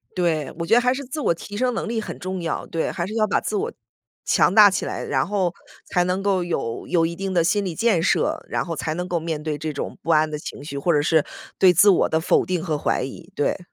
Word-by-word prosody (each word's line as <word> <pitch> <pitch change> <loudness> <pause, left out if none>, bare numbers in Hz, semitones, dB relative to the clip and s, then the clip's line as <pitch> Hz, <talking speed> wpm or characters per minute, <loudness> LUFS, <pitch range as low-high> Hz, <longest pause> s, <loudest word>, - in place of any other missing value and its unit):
对， 165 -5 0
我 170 - -3
觉 175 - +1
得 240 - +6
还 250 +1 +2
是 280 - -5
自 270 +5 -5
我 170 - +2
提 205 +5 -9
升 250 +3 +1
能 230 - -3
力 225 -1 -2
很 - - -7
重 185 0 -4
要。 165 - -3
对， 165 - -2
还 170 - -3
是 210 - -6
要 215 -1 +2
把 - - +2
自 - - -3
我 435 +4 -1 0.5
强 - - +3
大 210 -1 +9
起 195 - -2
来， - - -4
然 135 +1 0
后 190 -4 0 0.3
才 180 - +1
能 180 +2 -1
够 195 -3 +1
有 135 -9 -3
有 165 -2 +2
一 170 - -3
定 195 +1 -3
的 170 -2 +3
心 205 +4 +1
理 180 -4 -4
建 215 -4 +2
设， - - +1
然 - - -1
后 165 - -4
才 155 0 -3
能 180 +1 -3
够 175 -2 -1
面 160 -2 -4
对 150 -1 -3
这 155 +1 -4
种 145 - -5
不 - - -8
安 155 0 +4
的 150 - -4
情 145 - -8
绪， 140 -1 -6
或 155 +5 +1
者 145 - +3
是 160 0 +3 0.4
对 185 - +7
自 190 +5 +6
我 190 - +3
的 160 - +1
否 160 - +2
定 180 -3 -2
和 160 -5 -1
怀 145 - 0
疑， 135 - -8
对。 145 - 0
175 Hz, 295 characters per minute, -23 LUFS, 160-200 Hz, 0.5 s, 大